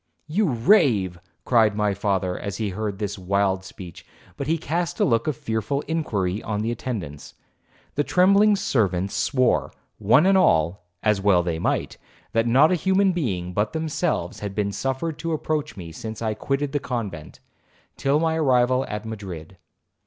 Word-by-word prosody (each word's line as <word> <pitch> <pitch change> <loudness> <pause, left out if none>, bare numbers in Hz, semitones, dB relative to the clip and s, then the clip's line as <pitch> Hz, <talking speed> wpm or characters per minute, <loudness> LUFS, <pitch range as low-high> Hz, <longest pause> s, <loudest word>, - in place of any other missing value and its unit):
'You 190 +7 +1
rave,' 115 - +3 0.3
cried 110 -4 +3
my 105 -1 +1
father, 95 -2 -1
as 100 -1 -5
he 110 -2 -2
heard 100 +1 -4
this 105 -1 -4
wild 95 0 0
speech, 90 -2 -11 0.3
but 140 - -5
he 165 +2 +2
cast 170 +2 -2
a - - +4
look 115 +1 +1
of 150 -5 -1
fearful 110 +5 -2
inquiry 105 - -2
on 105 -1 -3
the 115 +2 -1
attendants. 100 - -6 0.6
The 145 - +1
trembling 200 +5 +4
servants 100 - 0
swore, 130 -3 +1 0.3
one 115 - +4
and 190 0 +5
all, 90 - +2 0.2
as 105 -2 +2
well 95 -3 +4
they 85 -2 -2
might, - - -1 0.3
that 115 +1 +1
not 135 +8 +5
a 180 -4 0
human 190 0 +3
being 95 - -2
but 105 +3 0
themselves 160 - -2
had 100 -2 -5
been 100 -1 0
suffered 135 +7 -3
to 165 +1 -2
approach 150 -5 -2
me 85 -3 -8
since 110 +6 -7
I 110 -2 -1
quitted 135 +5 -2
the 145 - 0
convent, 105 - -5 0.6
till 140 +2 +1
my 160 0 +1
arrival 130 -3 +3
at 105 +1 -5
Madrid. 95 -6 -8
110 Hz, 165 wpm, -24 LUFS, 100-150 Hz, 0.6 s, and